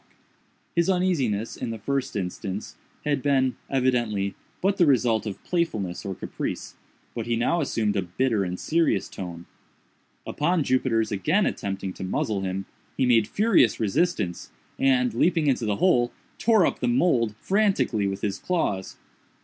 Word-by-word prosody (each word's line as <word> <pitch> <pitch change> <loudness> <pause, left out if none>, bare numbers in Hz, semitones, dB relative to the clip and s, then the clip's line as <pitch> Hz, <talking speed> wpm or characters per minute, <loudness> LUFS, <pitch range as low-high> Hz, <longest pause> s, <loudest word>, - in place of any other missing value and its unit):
His 170 +1 +2
uneasiness, 140 - 0
in - - -4
the 115 - -4
first 135 +4 -2
instance, 95 +1 -4 0.3
had 145 -2 +1
been, 130 -2 +2
evidently, 120 -7 +1 0.3
but 195 +1 +1
the 175 - +4
result 115 -5 +2
of 100 - -6
playfulness 110 - -1
or 95 -2 -4
caprice, - - -5 0.4
but 115 -1 -4
he 120 - +1
now 145 +9 +1
assumed 110 -7 0
a 100 - +2
bitter 105 +4 0
and 90 0 -4
serious 165 +1 +1
tone. 85 -2 -7 0.8
Upon 165 +2 +1
Jupiter's 125 -4 +1
again 95 -3 +2
attempting 95 -1 -3
to - - -7
muzzle 100 +2 -1
him, 95 0 -3 0.3
he 130 - +2
made 115 -4 +4
furious 200 - +3
resistance, 115 - 0 0.3
and, 125 -3 +3
leaping 165 +6 +2
into 130 -5 +1
the 105 - +1
hole, 120 - +3 0.3
tore 220 -6 +4
up - - -1
the 125 - 0
mould 120 -4 +2
frantically 195 - +1
with 95 0 -3
his 100 -2 -2
claws. 105 - -2
120 Hz, 150 wpm, -25 LUFS, 100-150 Hz, 0.8 s, the